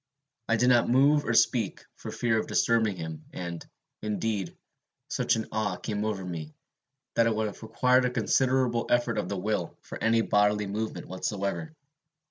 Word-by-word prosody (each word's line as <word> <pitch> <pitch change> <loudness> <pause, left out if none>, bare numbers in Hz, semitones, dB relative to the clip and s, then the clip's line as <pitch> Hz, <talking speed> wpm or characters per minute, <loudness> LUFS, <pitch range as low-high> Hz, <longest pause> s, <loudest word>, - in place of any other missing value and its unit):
I 115 - +4
did 125 +2 +3
not 120 -2 +4
move 140 +4 +4
or 115 - 0
speak, 115 -3 +2
for - - -8
fear 115 -2 +1
of - - -3
disturbing 110 -3 +2
him; 80 -2 -7
and, 85 -2 -5 0.4
indeed, 105 -2 -2 0.5
such - - +1
an 110 - -3
awe 105 -3 -1
came 105 +2 -3
over 100 -4 -2
me, 80 -4 -6 0.6
that 115 0 +3
it 115 - +1
would 110 0 0
have 105 - -6
required 125 +3 +3
a - - +2
considerable 125 0 +1
effort 120 -1 +2
of - - -3
the 100 - -2
will 95 -2 -2
for - - -8
any 115 0 +4
bodily 105 -1 +2
movement 105 +3 -4
whatever. 100 +11 -3
110 Hz, 170 wpm, -28 LUFS, 100-120 Hz, 0.6 s, I